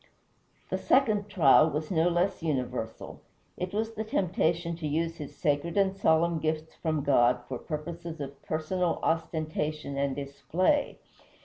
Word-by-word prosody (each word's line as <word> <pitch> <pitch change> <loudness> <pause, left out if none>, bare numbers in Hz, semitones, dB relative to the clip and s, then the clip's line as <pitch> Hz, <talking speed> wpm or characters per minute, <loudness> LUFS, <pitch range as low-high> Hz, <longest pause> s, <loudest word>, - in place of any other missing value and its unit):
The - - 0
second 215 -6 +2
trial 155 -4 +6
was 155 +2 -3
no 170 0 +3
less 175 +3 0
universal. 125 -7 -3 0.3
It 180 0 -4
was 220 +2 -2
the 220 - -3
temptation 170 -4 0
to 160 -3 -3
use 165 +3 -1
his 145 -3 -8
sacred 150 +5 0
and 195 -1 +3
solemn 165 -2 +2
gifts 155 0 -2
from 155 -3 -2
God 125 -3 +4
for 130 -2 -4
purposes 165 +1 -6
of 140 -1 -7
personal 165 +3 -1
ostentation 155 -3 -2
and 140 -1 0
display. 165 - 0
160 Hz, 140 wpm, -29 LUFS, 145-175 Hz, 0.3 s, trial